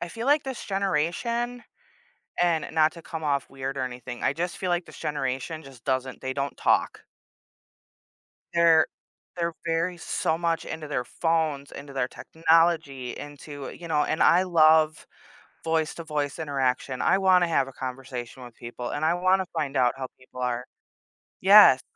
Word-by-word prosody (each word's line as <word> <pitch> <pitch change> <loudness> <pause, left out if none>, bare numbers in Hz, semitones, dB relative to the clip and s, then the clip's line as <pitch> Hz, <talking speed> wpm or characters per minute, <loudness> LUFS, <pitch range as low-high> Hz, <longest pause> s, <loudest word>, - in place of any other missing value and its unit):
I 175 - -4
feel 230 +7 -6
like 290 +1 +4
this 265 -2 -5
generation- 200 +7 -1 0.8
and 170 -3 +2
not 155 -1 +3
to 170 - -11
come 160 -1 -7
off 140 -2 0
weird 135 0 -5
or - - -1
anything- 125 -1 -6
I 135 - +2
just 175 +3 -3
feel 185 - -3
like 175 0 0
this - - -13
generation 145 +2 -3
just 135 -4 -14
doesn't 130 -1 -2
they 130 0 -3
don't 140 +1 -3
talk. - - +1 1.5
They're 165 -2 +5 0.5
they're 170 -1 -1
very 170 +2 0
so 160 -1 -1
much 165 -1 0
into 155 -1 -6
their 140 -4 -1
phones, 160 -4 -1
into 140 0 -9
their 130 -2 0
technology, 160 -5 +1
into, 145 -1 -8
you 170 - -10
know, 150 -2 +2
and 155 - -1
I 180 +2 +6
love 155 -3 +4 0.6
voice 160 -1 0
to 165 - -7
voice 150 -3 -2
interaction. 130 -3 -1
I 190 - +4
wanna 185 -2 +4
have 160 -5 +2
a 135 - -10
conversation 130 -1 -7
with 120 -2 -12
people 120 +1 -7
and 145 - -2
I 165 +2 +3
wanna 185 +1 +2
find 150 -4 -2
out 125 -2 +3
how 135 -1 -4
people 130 0 -12
are. 125 -1 -1 0.8
Yes, 195 -9 +8
155 Hz, 165 wpm, -26 LUFS, 135-170 Hz, 1.5 s, Yes